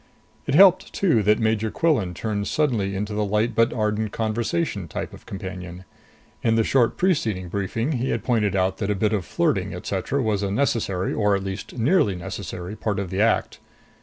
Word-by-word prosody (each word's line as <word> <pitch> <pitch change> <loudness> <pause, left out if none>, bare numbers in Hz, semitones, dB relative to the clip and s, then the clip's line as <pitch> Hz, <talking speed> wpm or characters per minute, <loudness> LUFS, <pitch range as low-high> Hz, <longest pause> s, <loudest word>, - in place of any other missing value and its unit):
It 140 - +1
helped, 185 +1 +6
too, 165 - +2
that 105 +1 +3
Major 110 -1 0
Quillan 110 - +1
turned 105 -1 -2
suddenly 110 -10 0
into 105 +2 -3
the 105 0 0
light 105 +3 0
but 115 +1 +3
ardent 105 -1 -1
conversation 110 - -2
type - - -5
of - - -14
companion. 95 -2 -7 0.6
In 115 -1 +2
the 115 - +3
short 120 0 +2
preceding 110 - 0
briefing 100 - -2
he 130 -2 -1
had - - -1
pointed 105 -6 +1
out 95 0 +1
that 100 -2 -2
a 105 - +1
bit 105 +2 +1
of 100 -5 -1
flirting, - - 0
etc., 140 - -2
was 105 -3 0
a 100 - -1
necessary, 100 -5 0
or 105 -2 +2
at 95 - -2
least 95 +5 -6
nearly 120 - +3
necessary, 90 +2 -6
part 105 -2 -2
of 95 -3 -3
the 95 +2 0
act. 115 +1 +1
105 Hz, 190 wpm, -23 LUFS, 95-115 Hz, 0.6 s, helped